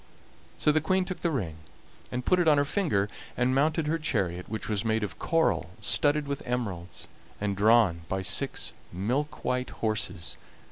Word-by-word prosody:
So 150 - +3
the 155 +1 +2
Queen 185 +4 +2
took 185 0 -5
the 170 - +1
ring 95 - -2 0.5
and 125 0 -3
put 185 - +4
it 175 - +3
on 150 -2 +6
her 145 - +3
finger, 145 - +1 0.3
and 125 +1 +2
mounted 155 +4 +2
her 160 +2 0
chariot, 90 - -1
which 110 0 -4
was 105 -3 0
made 110 -1 +1
of 105 - -5
coral 165 - +1
studded 145 +6 +2
with 140 -1 -3
emeralds, 100 -8 -4 0.3
and 100 -1 -1
drawn 105 -4 +4
by 95 0 -1
six 100 +8 -1 0.2
milk 125 - -2
white 125 0 0
horses. 110 -7 -2
125 Hz, 175 wpm, -28 LUFS, 100-150 Hz, 0.5 s, on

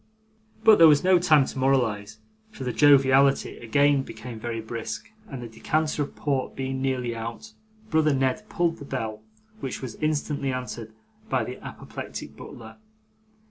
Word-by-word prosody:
But 220 -4 +7
there 165 - +10
was 150 0 +5
no 185 -1 +5
time 155 -5 +5
to 130 - -6
moralise, 110 -6 +1 0.3
for 145 - -9
the 125 -2 -2
joviality 135 +2 +4
again 140 +4 +3
became 115 -1 -8
very 115 0 -4
brisk, 110 -1 -6 0.2
and 130 -3 -7
the - - -6
decanter 155 +7 -1
of 145 - -4
port 135 -3 -2
being 135 0 -3
nearly 125 -3 -1
out, 115 - -7 0.4
brother 155 -1 +3
Ned 135 +9 0
pulled 170 -1 0
the 145 - -10
bell, 110 -6 -4 0.4
which 135 -2 -4
was 125 - -5
instantly 145 -2 -1
answered 125 -3 -5 0.4
by - - +1
the - - -8
apoplectic - - -8
butler. 110 -2 -11
130 Hz, 155 wpm, -25 LUFS, 115-145 Hz, 0.4 s, there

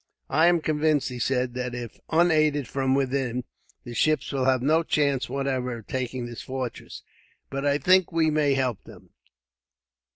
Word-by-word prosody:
"I 160 +2 +4
am 175 -1 +3
convinced," 155 -2 +1
he 125 -1 -7
said, 125 0 0
"that 125 0 -4
if 120 -3 -7
unaided 155 -5 +3
from 135 +2 0
within, 130 -2 -1 0.4
the 120 - -8
ships 155 +6 +1
will 135 -2 -1
have 130 -1 +2
no 155 +4 +3
chance 140 -5 0
whatever 130 -2 -2
of 115 - -12
taking 130 -1 -3
this 120 -1 -7
fortress; 130 -2 -6 0.5
but 140 +1 -2
I 140 0 +3
think 185 +3 +4
that 170 - -14
we 160 -1 +3
may 150 -2 +2
help 125 -6 -1
them. - - -15
135 Hz, 170 wpm, -25 LUFS, 125-155 Hz, 0.5 s, I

